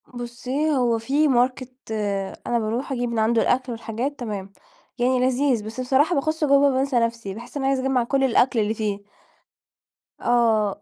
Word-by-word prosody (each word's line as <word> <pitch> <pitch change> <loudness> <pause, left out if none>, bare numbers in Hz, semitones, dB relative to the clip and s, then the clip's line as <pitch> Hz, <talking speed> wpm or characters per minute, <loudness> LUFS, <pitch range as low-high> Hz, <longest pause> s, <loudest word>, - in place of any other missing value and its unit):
بُصي 250 +5 -3
هو 245 -5 +2
في 280 +7 +1
Market 255 -1 +1 0.8
أنا 240 - +1
باروح 230 +5 -3
أجيب 245 -2 -1
من 230 -1 -2
عنده 225 +1 +2
الأكل 255 0 +1
والحاجات 230 +5 -4
تمام. 200 -5 -5 0.4
يعني 250 +1 +2
لذيذ، 255 -2 +1
بس 225 +3 -7
بصراحة 275 +7 +2
باخش 310 +3 -1
جوا 280 -1 +5
بانسى 265 -1 +1
نفسي 230 -4 -2
باحس 235 +7 -9
أنا 270 -1 -1
عايزة 270 -1 +1
أجمع 265 -2 +1
كل 270 +3 0
الأكل 250 -1 +3
اللي 215 0 +1
فيه. 210 -2 -2 1.2
آه. 220 -4 +2
245 Hz, 160 wpm, -23 LUFS, 230-270 Hz, 1.2 s, جوا